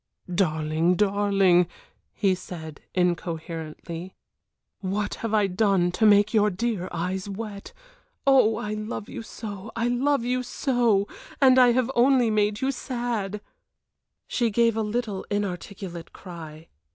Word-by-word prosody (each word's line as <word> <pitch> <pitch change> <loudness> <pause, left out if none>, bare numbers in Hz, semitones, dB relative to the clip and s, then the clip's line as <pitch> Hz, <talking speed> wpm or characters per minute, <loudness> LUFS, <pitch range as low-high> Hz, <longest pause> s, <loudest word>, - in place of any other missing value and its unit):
"Darling 160 -1 +1
darling," 195 -3 +3 0.4
he 195 -2 +1
said, 160 -4 -8
incoherently, 170 0 -3 0.6
"what 205 +1 -2
have 230 - -2
I 215 -2 +3
done 195 -2 +2
to 220 +4 +3
make 205 +1 +5
your 210 -1 +4
dear 200 -1 -2
eyes 185 +3 -3
wet? 200 0 -6 0.5
Oh, 255 -5 +5
I 210 0 -3
love 215 0 -5
you - - -6
so, 205 -4 -8
I 230 +1 0
love 265 +1 +1
you 250 +1 0
so, 240 -6 +1 0.3
and 260 -2 +6
I 245 -1 +6
have 255 +1 +1
only 245 -2 +4
made 210 0 +1
you 265 +1 +1
sad." 235 -6 -3 0.9
She 235 -2 +1
gave 230 +1 +3
a 225 - 0
little, 215 -2 -2
inarticulate 190 -3 -4
cry. 160 -4 -10
205 Hz, 130 wpm, -25 LUFS, 180-230 Hz, 0.9 s, and